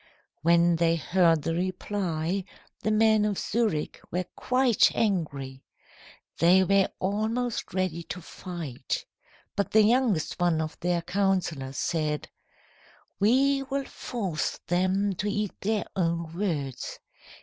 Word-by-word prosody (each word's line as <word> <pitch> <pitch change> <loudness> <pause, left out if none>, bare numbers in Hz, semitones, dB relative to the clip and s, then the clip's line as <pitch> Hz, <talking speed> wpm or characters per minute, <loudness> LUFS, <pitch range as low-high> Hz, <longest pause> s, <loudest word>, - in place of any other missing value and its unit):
"When 170 +1 +4
they 165 0 +3
heard 165 -1 +3
the 165 - -1
reply, 185 0 -2 0.4
the - - 0
men 215 0 +4
of 210 -2 0
Zurich 215 -9 -1
were 180 +2 -2
quite 255 -3 +3
angry. 140 -10 -1 0.8
They 180 +3 +6
were 195 +1 +3
almost 220 +5 -1
ready 185 -3 -1
to 180 - -6
fight. 165 -7 -5 0.5
But 200 - 0
the 220 0 +7
youngest 225 -8 +2
one 175 -2 +2
of 155 0 -3
their 175 -1 0
councillors 180 -8 -1
said: 155 -3 -1 0.9
"'We 270 +7 +4
will 275 0 -1
force 195 -15 -3
them 185 +3 +1
to 205 - -1
eat 210 -1 -1
their 215 +1 0
own 170 -3 -1
words. 155 - -3
185 Hz, 120 wpm, -27 LUFS, 165-210 Hz, 0.9 s, the